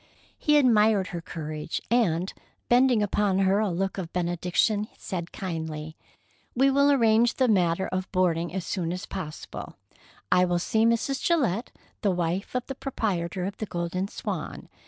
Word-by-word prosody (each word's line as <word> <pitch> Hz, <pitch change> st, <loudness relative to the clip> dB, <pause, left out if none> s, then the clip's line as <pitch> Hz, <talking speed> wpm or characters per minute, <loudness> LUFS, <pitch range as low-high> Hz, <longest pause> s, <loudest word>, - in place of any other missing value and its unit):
He 300 Hz, -1 st, +4 dB
admired 215 Hz, -7 st, +4 dB
her 170 Hz, -, -5 dB
courage, 155 Hz, -1 st, -5 dB
and, 190 Hz, -7 st, +2 dB, 0.4 s
bending 245 Hz, -3 st, +4 dB
upon 205 Hz, -1 st, +1 dB
her 195 Hz, +1 st, +3 dB
a 215 Hz, -2 st, +1 dB
look 190 Hz, +3 st, -2 dB
of 175 Hz, -2 st, -5 dB
benediction, 180 Hz, +4 st, 0 dB
said 175 Hz, -3 st, -5 dB
kindly: 160 Hz, -3 st, -5 dB, 0.6 s
"We 270 Hz, +2 st, +4 dB
will 280 Hz, +1 st, +4 dB
arrange 230 Hz, -3 st, +4 dB
the 260 Hz, -, +2 dB
matter 185 Hz, -4 st, +2 dB
of 185 Hz, 0 st, -3 dB
boarding 175 Hz, -3 st, +1 dB
as 185 Hz, -1 st, -4 dB
soon 170 Hz, -3 st, -2 dB
as 180 Hz, +1 st, -4 dB
possible. 155 Hz, -6 st, -7 dB, 0.6 s
I 180 Hz, -, +5 dB
will 175 Hz, -1 st, +1 dB
see 220 Hz, +6 st, +2 dB
Mrs. 235 Hz, +4 st, 0 dB
Gillette, 245 Hz, -, +1 dB, 0.3 s
the 205 Hz, -, +2 dB
wife 180 Hz, +4 st, -1 dB
of 250 Hz, -, -1 dB
the 270 Hz, -, -5 dB
proprietor 190 Hz, -10 st, -2 dB
of 195 Hz, -, -5 dB
the 215 Hz, -, -4 dB
Golden 175 Hz, +2 st, -2 dB
Swan. -, -, -5 dB
190 Hz, 155 wpm, -26 LUFS, 175-225 Hz, 0.6 s, I